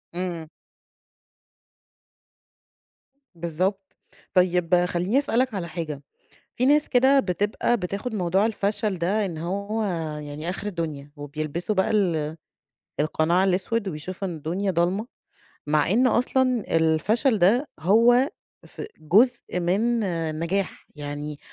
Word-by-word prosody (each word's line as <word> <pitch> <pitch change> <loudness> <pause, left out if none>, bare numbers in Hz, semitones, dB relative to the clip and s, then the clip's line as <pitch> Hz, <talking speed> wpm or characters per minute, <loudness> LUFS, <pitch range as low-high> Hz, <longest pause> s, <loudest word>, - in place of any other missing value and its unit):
إمم. 175 -3 -3 2.9
بالضبط، 185 +4 -2 0.4
طيب 180 -1 +3
خليني 180 +8 +1
أسألك 260 -4 0
على 180 -4 -3
حاجة، 155 -5 -5 0.6
في 250 - +2
ناس 295 +2 +4
كده 265 +2 +5
بتبقى 205 +5 0
بتاخد 200 +5 -4
موضوع 190 +2 +2
الفَشَل 205 -2 -1
ده 200 +5 +1
إن 165 -4 -6
هو 200 +6 -2 0.4
يعني 150 +3 -6
آخر 190 +3 -5
الدنيا، 155 -7 -4
وبيلبسوا 155 +7 -3
بَقى 190 - +1
ال 165 -7 0 0.6
القناع 160 +4 +2
الأسوِد، 195 +3 0
وبيشوفوا 185 +4 -5
إن 170 - -5
الدنيا 180 +6 -2
ضلمة، 185 +7 0 0.6
مع 150 +2 +2
إن 250 +5 +4
أصلًا 250 -1 +2
الفَشَل 205 - +2
ده 225 +11 +3
هو 235 - +5 0.4
ف - - -9 0.2
جزء 205 +3 +2
من 220 +7 +1
آآ، 165 -4 -1
النجاح، 170 +5 -3
يعني 145 0 -5
185 Hz, 115 wpm, -24 LUFS, 165-220 Hz, 2.9 s, كده